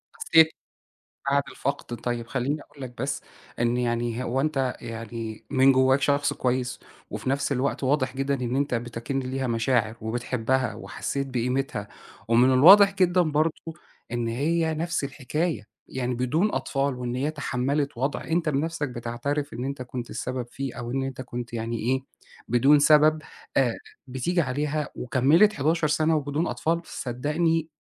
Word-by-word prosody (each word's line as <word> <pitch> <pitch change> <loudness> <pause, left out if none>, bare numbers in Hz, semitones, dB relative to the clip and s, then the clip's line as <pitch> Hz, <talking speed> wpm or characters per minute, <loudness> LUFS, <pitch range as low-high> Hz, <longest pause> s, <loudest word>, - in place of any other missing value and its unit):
حسّيت 160 - +5 0.8
بعد 140 0 +3
الفقْد 135 -3 -4
طيب 120 -1 -3
خلّيني 135 +5 -2
أقول 140 -1 -14
لك 125 -2 -7
بس، 135 - -2 0.4
إن 120 +1 +2
يعني 120 0 -1
هو 130 +2 0
أنت 135 -4 0
يعني 115 -1 -6
من 135 0 +5
جواك 130 +1 +4
شخص 145 0 +2
كويس، 125 0 -1 0.3
وفي - - -3
نَفْس 140 +1 0
الوقت 135 +1 -1
واضح 130 -1 +1
جدًا 135 +1 0
إن 125 -1 -2
أنت 140 -1 0
بتَكِن 120 +3 -3
ليها 130 +1 -3
مشاعر، 115 -1 +1
وبتحبها 120 +2 -1
وحسّيت 140 0 -4
بقيمتها، 125 -4 -2 0.4
ومن 120 +3 +5
الواضح 195 +9 +8
جدًا 180 -2 +3
برضه 155 0 +1 0.6
إن 120 -1 -1
هي 160 +7 0
نفس 165 -1 -1
الحكاية، 150 +3 -2 0.2
يعني 125 -1 -2
بدون 150 - +1
أطفال 140 -1 -1
وإن 125 -1 -4
هي 140 +4 0
تحملت 140 -1 -1
وضع 135 +3 -1
أنت 165 0 0
بنَفْسك 155 +1 -1
بتعترف 130 +5 -3
إن 125 - -4
أنت 140 -1 -4
كنت 125 -1 -6
السبب 125 -1 -4
فيه 135 -2 -5
أو 120 -1 -5
إن 135 +2 -1
أنت 135 -1 -5
كنت 120 -1 -6
يعني 115 0 -3
إيه، 130 +4 0 0.5
بدون 135 +5 +5
سبب 155 +1 +5 0.3
آآ، 125 -4 +3 0.3
بتيجي 130 +8 -1
عليها 150 +1 -1
وكمّلِت 140 - +4
11 155 -1 +1
سنة 155 +1 +2
وبدون 145 +2 -1
أطفال، 165 +1 0
صدّقني 155 +6 -1
135 Hz, 150 wpm, -26 LUFS, 125-150 Hz, 0.8 s, الواضح